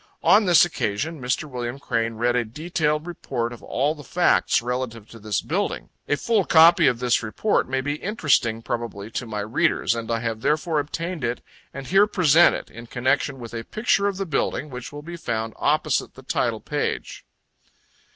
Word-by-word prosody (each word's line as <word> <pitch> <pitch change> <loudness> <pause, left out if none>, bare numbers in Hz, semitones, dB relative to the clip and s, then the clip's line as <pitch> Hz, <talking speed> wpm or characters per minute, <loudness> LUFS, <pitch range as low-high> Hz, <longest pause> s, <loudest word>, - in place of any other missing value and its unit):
On 210 +1 +5
this 175 -2 +6
occasion 155 0 -3
Mr. 125 +4 -1
Wm. 125 -1 -5
Crane 115 -4 -2
read 120 +2 +1
a 125 - +2
detailed 150 +5 -2
report 125 -8 -4
of 120 - -12
all 140 +5 0
the 150 -2 -12
facts 180 +4 +2
relative 120 -3 -4
to 115 - -11
this 105 -2 -1
building - - -2 0.2
a 145 - +2
full 210 - +1
copy 170 -1 +6
of 125 - +2
this 125 -1 +1
report 120 - 0
may 130 0 0
be 145 +2 -2
interesting 140 - +1
probably 115 -3 -4
to 120 - -4
my 105 -2 -3
readers, 110 +2 +1
and 115 -1 -5
I 115 -1 0
have 115 -2 -3
therefore 155 +2 +1
obtained 165 +2 -4
it, 120 +1 -2 0.3
and 135 0 -8
here 195 +7 +4
present 175 -4 +5
it, - - -8
in 115 +1 -10
connection 130 +3 0
with 120 -2 -9
a 115 -1 -4
picture 210 - +1
of 200 -2 -2
the 195 - -2
building, 150 -2 -2
which 125 -1 -7
will 145 0 -9
be 170 +2 -7
found 110 -6 -3
opposite - - 0
the - - -13
title - - -1
page. - - -3
130 Hz, 190 wpm, -23 LUFS, 115-165 Hz, 0.3 s, this